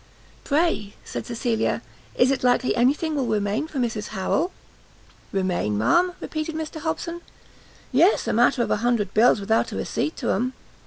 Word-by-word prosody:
"Pray," 285 -9 0
said - - -5
Cecilia, 235 -1 -1 0.3
"is 255 +2 +4
it 270 - -1
likely 250 0 +2
any 245 +2 +4
thing 315 -1 -3
will 270 -4 0
remain 210 +6 0
for 310 - -8
Mrs 225 -4 -1
Harrel?" 215 - -1 0.8
"Remain, 180 - 0
ma'am?" 350 - +3
repeated 310 0 -4
Mr 315 0 -5
Hobson, 335 +2 -3 0.7
"Yes, 330 - +4
a - - +1
matter 240 +1 +3
of - - -3
a - - +3
hundred 230 -2 0
bills 225 0 +5
without 220 +3 +1
a - - -5
receipt 310 - -2
to - - -1
'em! 250 +6 0
245 Hz, 165 wpm, -24 LUFS, 215-310 Hz, 0.8 s, bills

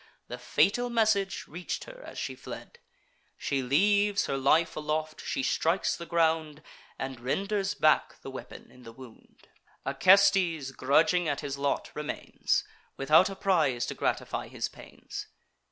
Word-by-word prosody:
The - - -6
fatal 245 +5 +2
message 220 -4 +1
reach'd 175 +3 -5
her - - -12
as - - -10
she - - -3
fled: 475 - -10 0.6
She 140 -2 -1
leaves 200 +10 +3
her - - -2
life 140 +5 +2
aloft; 155 0 -3
she 135 - -2
strikes 165 +7 +1
the 170 - -8
ground, 160 -2 +1 0.3
And 135 -2 -5
renders 195 - -1
back 155 0 +2
the 135 - -7
weapon 130 - -10
in 125 - -17
the 115 -2 -11
wound. 125 -2 -16 0.4
Acestes, 180 -1 +4
grudging 160 +7 +2
at 145 - -2
his 140 -1 -4
lot, 140 0 -1
remains, 150 0 -2 0.3
Without 155 +7 +5
a 195 - -6
prize 160 -11 +1
to - - -4
gratify - - -2
his - - -3
pains. - - -10
160 Hz, 145 wpm, -29 LUFS, 135-195 Hz, 0.6 s, Without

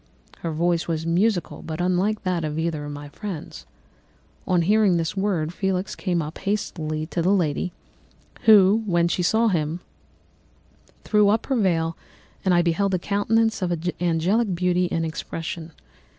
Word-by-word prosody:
Her 165 - -3
voice 170 +1 0
was 160 -1 -2
musical 180 +3 0
but 160 0 -6
unlike 185 +4 0
that 180 -3 -1
of 155 0 -3
either 160 -2 -2
of 145 - -6
my 145 0 -8
friends. 185 0 -7 0.8
On 180 -2 +3
hearing 205 -1 +4
this 165 +2 -2
word, 185 -5 -1
Felix 190 0 -2
came 175 -4 -1
up 150 +2 -7
hastily 160 -6 -2
to 170 +2 -2
the 175 - +2
lady, 180 -2 +1 0.7
who, 210 0 +7
when 170 -2 +2
she 175 - -1
saw 220 +6 +3
him, 160 -2 -1 1.2
threw 210 -2 +3
up 220 +2 +1
her 270 - 0
veil, 165 -7 +1 0.5
and 190 - +2
I 175 -1 +4
beheld 185 +3 +1
a - - +2
countenance 215 +4 +1
of 175 -2 -2
angelic 180 +5 +1
beauty 180 0 +1
and 165 0 0
expression. 165 +1 -5
175 Hz, 155 wpm, -24 LUFS, 165-200 Hz, 1.2 s, who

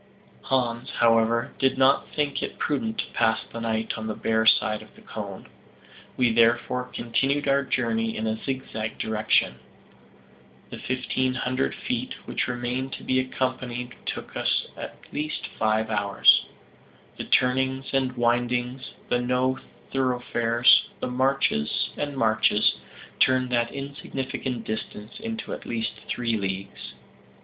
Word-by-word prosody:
Hans, 120 -2 0
however, 115 0 +3
did 135 0 +2
not 135 +1 +4
think 145 -2 0
it - - -4
prudent 225 +9 -1
to - - -3
pass 110 -1 +2
the 115 - -4
night 110 -1 -1
on 110 - -4
the 110 - -2
bare 110 0 +1
side 110 -1 +4
of - - -16
the - - -16
cone. - - -7 0.7
We 125 -2 +4
therefore 120 +2 +3
continued 135 +4 0
our 140 0 +4
journey 115 -3 0
in 110 - -2
a 110 0 -2
zigzag 115 -5 -4
direction. 110 0 +1 1.1
The - - -7
fifteen 130 0 -1
hundred 125 - -1
feet - - -3
which - - -1
remained 125 +2 -2
to - - -7
be 130 - +2
accomplished 130 -1 -2
took - - -5
us - - +1
at - - -7 0.2
least 155 +1 -3
five 110 0 +1
hours. 100 -1 +5 0.7
The - - -4
turnings 130 +1 +1
and 130 -2 +1
windings, 120 +2 0
the 125 - +1
no 125 +1 +1 0.3
thoroughfares, 125 -2 +3
the - - -2
marches 130 - +1
and 145 -1 -3
marches, 110 -2 +3 0.5
turned 130 -1 +3
that 120 -1 +1
insignificant 135 -3 -4
distance 110 - -6
into 225 0 -5
at - - -7
least 115 -1 -1 0.2
three 115 -2 0
leagues. 95 -1 -5
125 Hz, 135 wpm, -26 LUFS, 115-130 Hz, 1.1 s, hours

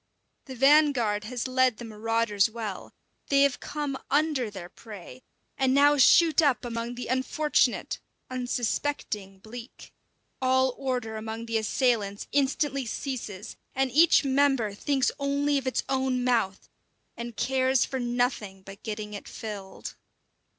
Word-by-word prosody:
The 265 - -8
vanguard 265 -6 +4
has 245 +2 -3
led 255 -2 +2
the 240 - -8
marauders 225 -1 +1
well; 220 -4 -6 0.4
they 275 0 +5
have 280 -3 +1
come 290 -2 -4
under 290 -5 +1
their 190 -4 -8
prey, 180 - -11 0.4
and 265 0 +3
now 290 +1 +6
shoot 320 +4 +6
up 280 -5 +2
among 235 0 -4
the 245 - -5
unfortunate, 260 +4 0 0.3
unsuspecting 245 -5 -3
bleak. 230 +5 -11 0.5
All 260 0 +3
order 250 -5 -3
among 220 +1 -5
the 230 -1 0
assailants 220 -3 0
instantly 275 -1 0
ceases, 220 -5 -5 0.2
and 265 -1 +1
each 310 +2 +5
member 270 -6 +2
thinks 270 +5 0
only 280 +1 +1
of 265 - -8
its 260 - 0
own 260 -2 0
mouth, 225 -6 0 0.5
and 235 -1 -7
cares 260 -1 +2
for 265 - -4
nothing 240 -6 -1
but 195 +2 -12
getting 210 -1 -5
it 205 - -8
filled. 200 -3 -7
250 Hz, 135 wpm, -27 LUFS, 220-270 Hz, 0.5 s, now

